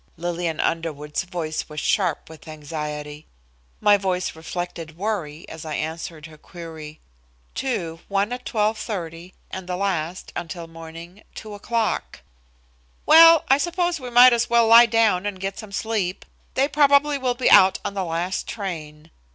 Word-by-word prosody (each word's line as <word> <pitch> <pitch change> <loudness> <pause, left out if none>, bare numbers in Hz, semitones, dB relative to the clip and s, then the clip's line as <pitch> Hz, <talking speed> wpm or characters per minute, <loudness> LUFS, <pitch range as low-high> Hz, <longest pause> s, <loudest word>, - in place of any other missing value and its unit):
Lillian 170 -1 -3
Underwood's 150 -3 -2
voice 165 -5 -4
was 150 0 -6
sharp 180 -1 0
with 160 0 -14
anxiety. 150 -1 -6 0.5
My 205 -1 +5
voice 185 -3 -2
reflected 165 -1 -6
worry, 175 -7 -4
as 160 - -9
I 155 -2 -4
answered 160 0 -5
her 155 -2 -14
query. 160 -3 -10 0.5
"Two, 170 -11 -3
one 200 +3 0
at 250 0 -6
12:30, 190 -6 -3 0.2
and 190 -1 -7
the 180 - -2
last, 185 -3 -3
until 170 0 -6
morning, 165 +3 -11
2 215 -1 -8
o'clock." 225 +2 -2 0.8
"Well, 330 0 +8
I 270 +1 +4
suppose 345 0 -1
we 250 -2 -7
might 245 +1 +8
as 235 -1 0
well 235 0 +4
lie 230 +1 +8
down 215 -4 +2
and 195 -2 -5
get 195 +1 -4
some 215 -3 -9
sleep. 200 -3 -2 0.3
They 270 +1 +3
probably 285 0 +3
will 250 -2 0
be 250 - +2
out 190 0 +7
on - - -3
the 195 -1 -2
last 175 +2 -3
train." 160 -7 -7
180 Hz, 150 wpm, -23 LUFS, 160-225 Hz, 0.8 s, Well